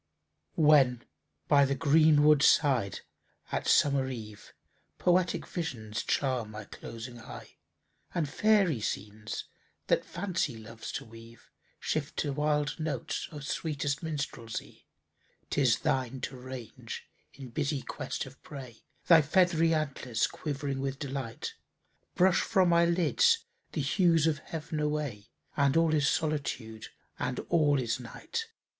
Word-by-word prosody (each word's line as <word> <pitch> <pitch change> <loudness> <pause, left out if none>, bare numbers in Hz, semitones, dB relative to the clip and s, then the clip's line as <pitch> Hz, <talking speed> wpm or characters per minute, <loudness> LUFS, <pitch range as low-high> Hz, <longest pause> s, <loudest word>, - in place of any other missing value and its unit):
When 140 -6 +5 0.4
by 145 -2 +6
the 140 0 0
green 155 0 +5
wood 150 -1 +6
side, 130 - +3 0.5
at - - -2
summer 140 -2 +4
eve, 110 -5 -8 0.5
Poetic 180 0 +2
visions 115 - -4
charm 130 -6 0
my 105 0 -7
closing 115 +3 -9
eye; - - -11 0.6
And 165 -4 +1
fairy 190 - +3
scenes, 105 +1 -4 0.4
that - - +2
Fancy 170 - -2
loves 110 0 -8
to - - -4
weave, 115 +1 -15 0.3
Shift 150 -2 -2
to 145 -2 0
wild 150 +1 0
notes 150 -6 -3
of 145 -3 -7
sweetest 145 -2 -2
Minstrelsy; 140 -8 -5 0.6
'Tis 130 -5 +3
thine 130 -1 -1
to 135 - -4
range 125 -2 -8 0.3
in 135 -2 -10
busy 145 +1 -1
quest 135 -3 -4
of 130 0 -14
prey, 130 -6 -10 0.2
Thy 165 -2 +8
feathery 165 +1 +3
antlers 135 -7 0
quivering 140 -2 -3
with 135 0 -2
delight, 135 -5 -5 0.6
Brush 185 0 +4
from 190 -5 +3
my 170 0 +5
lids 185 - +3 0.3
the 155 - -1
hues 165 +2 +3
of 155 -3 +1
heav'n 155 0 -5
away, 150 -9 -2 0.3
And 140 +1 +3
all 165 -1 +4
is 145 -2 +3
Solitude, 140 -8 -2 0.3
and - - -2
all 150 -4 +4
is 115 -1 -1
Night! 355 - -5
140 Hz, 130 wpm, -30 LUFS, 125-160 Hz, 0.6 s, Thy